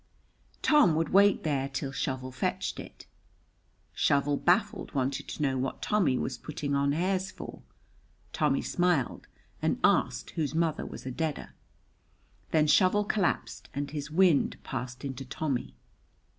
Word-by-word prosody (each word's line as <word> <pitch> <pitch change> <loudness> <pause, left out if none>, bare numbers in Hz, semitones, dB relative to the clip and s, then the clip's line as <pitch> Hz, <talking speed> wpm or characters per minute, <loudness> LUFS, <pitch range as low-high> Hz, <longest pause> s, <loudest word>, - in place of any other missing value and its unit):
Tommy 295 - +5
would 160 0 0
wait 200 +1 +5
there 140 -3 0
till 135 0 -3
Shovel 130 -1 -3
fetched 125 - -2
it. - - -10 0.9
Shovel, 145 0 +2
baffled, 190 +3 +1
wanted 135 0 -1
to 150 - -4
know 135 -2 +1
what 130 +1 -3
Tommy 175 -12 +2
was 130 - -3
putting 145 -2 -4
on 140 0 +2
hairs 185 +4 0
for. - - -9 0.7
Tommy - - +1
smiled, 175 -7 0 0.3
and - - 0
asked - - +2
whose 155 -1 -2
mother 165 -2 0
was - - -9
a 130 - -3
deader. 155 +2 -3 1.0
Then 155 -2 +3
Shovel 185 +6 +4
collapsed, 205 -2 -1
and 140 0 -3
his 145 -1 -5
wind 170 -1 +3
passed 125 +1 -5
into 135 -1 -5
Tommy. 130 - -3
145 Hz, 140 wpm, -29 LUFS, 135-175 Hz, 1.0 s, Tommy